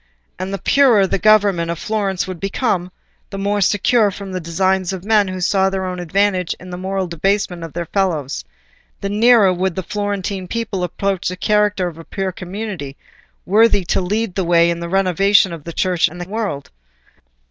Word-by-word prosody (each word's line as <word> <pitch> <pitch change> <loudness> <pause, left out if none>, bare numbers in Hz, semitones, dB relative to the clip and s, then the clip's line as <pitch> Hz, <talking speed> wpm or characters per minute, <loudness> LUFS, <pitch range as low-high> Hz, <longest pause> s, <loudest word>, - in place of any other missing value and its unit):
And 185 +1 -4
the 195 - -2
purer 235 -1 +4
the 190 - -1
government 200 -5 +3
of 170 - -2
Florence 200 -2 -1
would 185 -2 -7
become—the 195 -1 -4
more 200 +1 0
secure 210 +3 +3
from 195 0 -8
the 185 - -3
designs 185 +2 0
of 190 -1 -6
men 210 -2 +3
who 185 0 -5
saw 190 +1 +2
their 190 -1 -3
own 180 -1 -4
advantage 185 +1 0
in 180 0 -11
the 180 - -5
moral 190 +1 -2
debasement 180 +1 -1
of 165 - -8
their 170 0 -3
fellows—the 175 +2 -4
nearer 215 -2 +5
would 185 -1 -1
the 190 - -3
Florentine 200 -1 -3
people 210 -3 -3
approach 195 +2 -2
the 180 - -6
character 210 -1 +1
of 165 -2 -8
a - - -9
pure 195 +2 -3
community, 185 -6 -6 0.5
worthy 210 0 +4
to 180 - 0
lead 210 +2 -1
the 190 - -1
way 170 0 +4
in 170 - -3
the 170 0 -5
renovation 195 0 +3
of 160 -3 -9
the 170 - -5
Church 180 0 +1
and 175 +3 -10
the 175 - -6
world. 200 -9 -4
190 Hz, 185 wpm, -19 LUFS, 175-205 Hz, 0.5 s, nearer